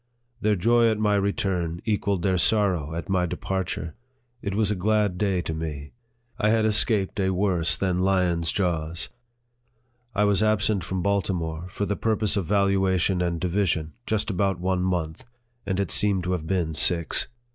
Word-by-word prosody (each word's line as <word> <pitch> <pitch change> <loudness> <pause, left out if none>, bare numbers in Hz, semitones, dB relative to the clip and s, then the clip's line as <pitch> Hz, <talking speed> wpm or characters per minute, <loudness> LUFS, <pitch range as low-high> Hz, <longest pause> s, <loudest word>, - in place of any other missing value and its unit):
Their 105 0 +2
joy 115 +4 +3
at 110 - 0
my 105 -1 +2
return 95 -4 -1
equalled 100 -4 0
their 95 -2 +2
sorrow 90 -8 +1
at 85 - -5
my 95 -2 +1
departure. 90 -2 -3 0.5
It 100 -1 -3
was 105 -1 +1
a - - 0
glad 105 0 +1
day 95 -4 +1
to 80 - -3
me. 75 -2 -5 0.5
I 105 - +2
had 110 0 +3
escaped 105 -2 +2
a 95 -1 +2
worse 90 -3 +1
than 90 -2 0
lion's 90 -3 +1
jaws. 85 -3 -2 1.1
I 105 - +3
was 100 -1 +3
absent 105 -3 +2
from 90 0 -3
Baltimore, 90 -4 -1
for 100 +2 -3
the 100 - -1
purpose 110 -1 0
of 95 -5 -1
valuation 95 -2 +2
and 85 -1 -1
division, 85 -4 0
just 110 0 0
about 95 -1 0
one 90 0 0
month, 85 -4 -2 0.4
and 95 0 -1
it 100 -4 -1
seemed 100 -3 +2
to 90 - -2
have 85 -4 -2
been 85 -3 0
six. 85 0 +1
95 Hz, 170 wpm, -25 LUFS, 85-100 Hz, 1.1 s, joy